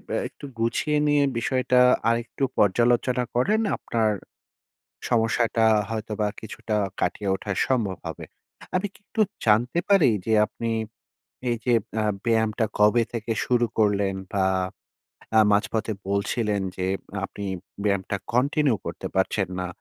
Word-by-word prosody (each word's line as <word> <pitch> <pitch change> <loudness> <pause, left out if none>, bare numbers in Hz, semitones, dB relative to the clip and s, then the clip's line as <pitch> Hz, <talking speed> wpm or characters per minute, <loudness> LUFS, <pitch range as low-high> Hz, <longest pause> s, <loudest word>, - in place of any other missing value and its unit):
আ - - +1
একটু - - -12
গুছিয়ে 150 +6 +1
নিয়ে 145 -1 +4
বিষয়টা 125 +1 +2 0.3
আরেকটু 120 +3 -2
পর্যালোচনা 120 +4 +3
করেন, 205 - +2 0.2
আপনার 110 -2 0 1.0
সমস্যাটা 115 -1 +2 0.2
হয়তো 110 -1 -4
বা 105 - +2
কিছুটা 110 0 -4 0.2
কাটিয়ে 100 -2 -1
ওঠা 100 +1 -5 0.2
সম্ভব 110 -8 0
হবে। - - -6 0.5
আমি 195 +3 +1
কি - - -20
একটু 220 - -1 0.2
জানতে 120 +9 +3
পারি 190 -10 +6 0.2
যে, 110 - +1
আপনি 115 +2 -5 0.8
এই 120 - +2
যে 120 - +3 0.3
আ - - 0 0.2
ব্যায়ামটা 110 -1 +2
কবে 105 +3 +5
থেকে 115 0 -3
শুরু 120 -1 +2
করলেন? 100 -2 +2 0.2
বা 95 -1 +2 0.9
আ - - +8
মাঝপথে 110 +1 +1 0.2
বলছিলেন 105 0 0 0.2
যে, 90 0 -1 0.4
আপনি 100 0 -7 0.4
ব্যায়ামটা 100 -1 0 0.2
continue 135 -1 +2
করতে - - -5
পারছেন - - +1
না। 90 - -2
115 Hz, 130 wpm, -25 LUFS, 105-125 Hz, 1.0 s, আ